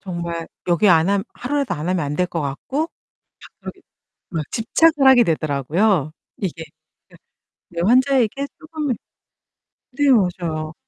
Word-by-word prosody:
정말 170 -3 -5 0.2
여기 175 +4 +3
안 165 0 +5
하면 200 -1 +1
하루라도 280 +1 -2
안 155 +3 -5
하면 185 -1 +1
안될 150 +6 -1
것 170 -2 -4
같고 260 - -3 0.5
갑자기 - - -12 0.5
막 160 -4 -3
집착을 290 +5 +3
하게 260 -2 +7
되더라고요 155 - 0 0.3
이게. 170 -4 -4 0.5
예. - - -16 0.5
네 170 0 -4
환자에게 260 +2 +2
쪼금 310 -5 -3 1.0
네, 280 +3 -2
맞아요. 170 -7 0
185 Hz, 260 characters per minute, -21 LUFS, 165-260 Hz, 1.0 s, 하게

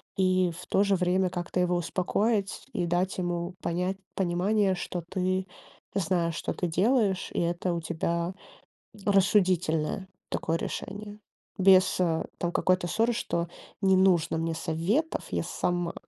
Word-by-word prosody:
и, 185 -1 +2
в 170 - -10
то 195 - +3
же 200 -1 +3
время, 185 +1 +2
как-то 175 0 -3
его 180 0 +2
успокоить, 195 +4 0
и 175 - 0
дать 180 +2 0
ему 175 0 -2
понять 180 +3 -1 0.2
понимание, 190 +2 +2
что 180 0 -4
ты 185 +2 -1 0.5
знаешь, 170 -3 0
что - - -3
ты 180 - -2
делаешь, 195 +2 +2
и - - -1
это 175 +1 0
у 170 - -2
тебя 170 +2 -2 0.7
рассудительное 185 -4 +2 0.2
такое 165 +1 -1
решение. 205 +4 -6 0.4
Без, 185 -1 +5
а, 165 -2 +1
там 175 - -1
какой-то 185 0 +2
ссоры, 225 +7 +1
что: 170 -7 -2 0.3
"Не 190 -1 +4
нужно 175 -4 +3
мне 165 0 -1
советов, 175 - -1
я - - 0
сама". 175 -1 -1
180 Hz, 140 wpm, -28 LUFS, 170-195 Hz, 0.7 s, Без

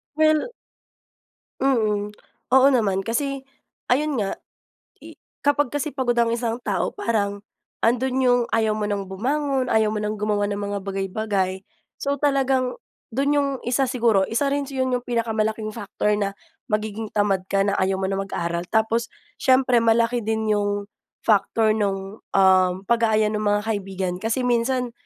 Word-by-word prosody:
Well. 310 +6 +3 1.1
Mm, 215 -6 +1 0.5
oo 265 +1 +7
naman, 200 -6 +1
kasi, 275 +4 -2 0.5
ayun 295 +2 +2
nga, 200 -4 -2 0.7
i - - -13 0.2
kapag 290 -2 +3
kasi 290 +2 -3
pagod 250 -3 0
ang 230 -1 +3
isang 235 -1 -1
tao, 200 -3 0
parang, 205 -3 -1 0.4
andun 250 +3 +1
'yung 245 -1 +4
ayaw 220 -1 +1
mo 210 -1 -2
ng 200 -1 -2
bumangon, 265 +7 -1
ayaw 220 -1 +2
mo 210 - -2
ng 210 0 -2
gumawa 205 -1 0
ng 200 - -2
mga 205 0 -3
bagay-bagay. 195 -1 -2 0.4
So 280 0 0
talagang, 270 - +1 0.3
do'n 280 +4 +1
'yong, 280 -1 +2 0.2
isa 265 +2 +2
siguro, 230 -6 +2
isa 235 +8 0
rin 285 0 0
'yon, 260 -2 -1
'yong 245 - -6
pinakamalaking 220 -2 -1
factor 210 -1 -2
na, 200 -1 -1 0.4
magiging 215 0 -2
tamad 200 -3 +1
ka 195 - +3
na, 200 0 +1
ayaw 190 0 0
mo 190 - -1
na 195 - -1
mag-aral. 170 -3 -3
Tapos, 225 +1 +1 0.2
siyempre 255 -1 +3
malaki 230 0 +2
din 220 0 -1
'yong, 205 0 -1 0.4
factor 215 +1 +3
nung, 200 -1 -2 0.2
um, 185 -1 +5
pag-aaya 220 -1 +2
ng 210 - -1
mga 205 0 +2
kaibigan. 195 -4 -2
Kasi 225 +4 -1
minsan, 245 0 0
220 Hz, 150 wpm, -23 LUFS, 205-255 Hz, 1.1 s, oo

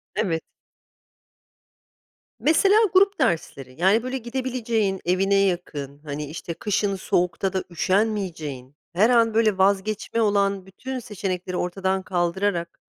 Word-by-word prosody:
Evet. 165 -6 -1 2.0
Mesela 330 - +4 0.2
grup 390 0 +4
dersleri; 155 - -1
yani, 205 +5 +4
böyle 255 +1 -3
gidebileceğin, 235 -5 -2
evine 195 +3 +2
yakın, 170 -8 -1
hani, 150 0 -5
işte 165 +3 -6
kışın 205 +1 -1
soğukta 185 +1 0
da 190 -1 -1
üşenmeyeceğin, 175 - -1 0.2
her 210 +7 +4
an 230 -2 +4
böyle 220 -3 +3
vazgeçme 200 +4 +1
olan 200 -2 +1
bütün 255 +7 -6
seçenekleri 185 -4 -4
ortadan 190 +1 -1
kaldırarak, 175 -1 -1
195 Hz, 110 wpm, -24 LUFS, 175-220 Hz, 2.0 s, Mesela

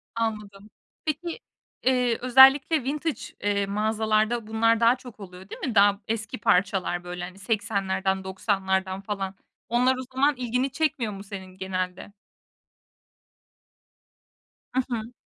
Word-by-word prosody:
Anladım. 210 -3 -4 0.4
Peki, 325 +5 -3 0.4
eee, 250 -2 +2
özellikle 265 +4 +6
vintage, 300 +4 -2 0.2
eee, 200 -1 +1
mağazalarda 215 +2 0
bunlar 225 +1 +2
daha 230 +1 +5
çok 245 -4 -13
oluyor, 190 -1 -11
değil - - -8
mi? 245 -4 -3
Daha 200 0 +5
eski 220 -2 -3
parçalar, 185 -2 +1
böyle, 180 0 -6
hani, 185 +2 -8
80'lerden, 195 -2 -1
90'lardan 190 0 -1
falan. 195 -1 -4 0.3
Onlar 250 +3 +3
o - - -4
zaman 280 +3 +3
ilgini 250 +2 -1
çekmiyor 260 -7 -1
mu 195 0 -8
senin 190 -2 -9
genelde? 185 0 -4 2.6
I - - +3
hı. 230 -1 -4
215 Hz, 120 wpm, -26 LUFS, 195-245 Hz, 2.6 s, özellikle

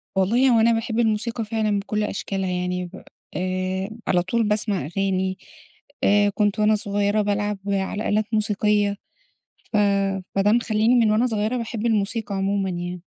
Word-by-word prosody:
والله 235 +8 +3
هو 230 -2 +4
أنا 230 +1 +4
باحب 225 0 -1
الموسيقى 225 0 0
فعلًا 215 -2 0
بكل 210 +1 -2
أشكالها 195 -2 -3
يعني، 180 0 -2
ب 185 +2 -11 0.3
آآ 185 +1 -2 0.2
على 180 -2 +3
طول 225 +6 0
باسمع 210 - 0
أغاني، 190 +2 -1 0.7
آآ 205 0 +4
كنت 205 0 0
وأنا 215 0 +4
صغيرة 205 +1 0
بالعب 205 0 -1
على 200 +2 -1
آلات 215 +1 +1
موسيقية، 210 -1 +1 0.8
ف - - +1 0.6
فده 205 +2 +3
مخلّيني 225 0 +2
من 230 -3 +4
وأنا 225 +4 +3
صغيرة 220 +1 -1
باحب 230 -1 -3
الموسيقى 215 -1 0
عمومًا 195 0 0
يعني. 175 0 -5
205 Hz, 150 wpm, -23 LUFS, 195-220 Hz, 0.8 s, هو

